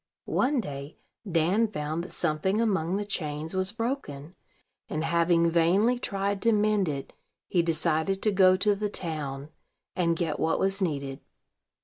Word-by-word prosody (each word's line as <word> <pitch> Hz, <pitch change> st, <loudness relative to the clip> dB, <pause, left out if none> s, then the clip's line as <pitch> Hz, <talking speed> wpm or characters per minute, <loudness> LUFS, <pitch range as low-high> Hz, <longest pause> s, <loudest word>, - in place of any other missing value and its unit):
One 275 Hz, +1 st, +1 dB
day 140 Hz, -6 st, -6 dB, 0.3 s
Dan 175 Hz, +8 st, +3 dB
found 160 Hz, -4 st, -3 dB
that 180 Hz, -, -9 dB
something 175 Hz, +5 st, 0 dB
among 190 Hz, -6 st, +1 dB
the 205 Hz, -, -3 dB
chains 155 Hz, -4 st, -3 dB
was 185 Hz, +1 st, +1 dB
broken; 225 Hz, -, -4 dB, 0.6 s
and, 155 Hz, +1 st, -2 dB
having 170 Hz, 0 st, +3 dB
vainly 190 Hz, +9 st, +3 dB
tried 200 Hz, -3 st, -1 dB
to 230 Hz, -, +3 dB
mend 210 Hz, -4 st, +2 dB
it, 140 Hz, -2 st, -5 dB, 0.3 s
he 175 Hz, -, +2 dB
decided 165 Hz, +2 st, 0 dB
to 215 Hz, -, +3 dB
go 185 Hz, -1 st, +5 dB
to 205 Hz, +2 st, +3 dB
the 205 Hz, +1 st, -2 dB
town, 150 Hz, -6 st, -4 dB, 0.5 s
and 170 Hz, -2 st, +1 dB
get 165 Hz, -3 st, -2 dB
what 160 Hz, -, +1 dB
was 195 Hz, +1 st, 0 dB
needed. 140 Hz, -6 st, -2 dB
175 Hz, 150 wpm, -27 LUFS, 155-200 Hz, 0.6 s, go